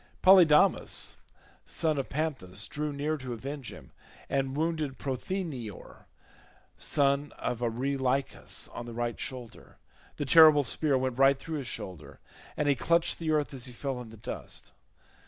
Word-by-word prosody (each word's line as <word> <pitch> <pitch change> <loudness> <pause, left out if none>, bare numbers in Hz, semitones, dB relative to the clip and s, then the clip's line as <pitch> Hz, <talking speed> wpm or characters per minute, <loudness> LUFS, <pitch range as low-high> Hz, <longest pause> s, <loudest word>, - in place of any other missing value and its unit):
Polydamas 180 -5 +5 0.5
son 155 -3 0
of 135 - -4
Panthous 135 - -1
drew 150 0 -3
near 145 +2 -2
to 130 -3 -6
avenge 135 +2 -6
him, - - -13 0.4
and 135 0 -1
wounded 155 -4 -1
Prothoenor 135 - -5 0.7
son 140 0 +1
of 125 -2 -3
Areilycus 130 +3 -1
on 120 - -7
the 115 - -8
right 120 -1 -2
shoulder; 125 -3 -8 0.4
the 145 - -3
terrible 155 0 +8
spear 140 +2 +2
went 130 -1 -2
right 135 0 +5
through 155 +2 -5
his 135 - -6
shoulder, 90 - -7 0.4
and 150 - 0
he 145 - +5
clutched 170 +5 +1
the 165 -2 -3
earth 150 -2 +1
as 130 -1 -1
he 125 - -7
fell 130 0 -4
in 120 - -10
the 110 - -12
dust. 105 - -8
140 Hz, 150 wpm, -29 LUFS, 125-150 Hz, 0.7 s, terrible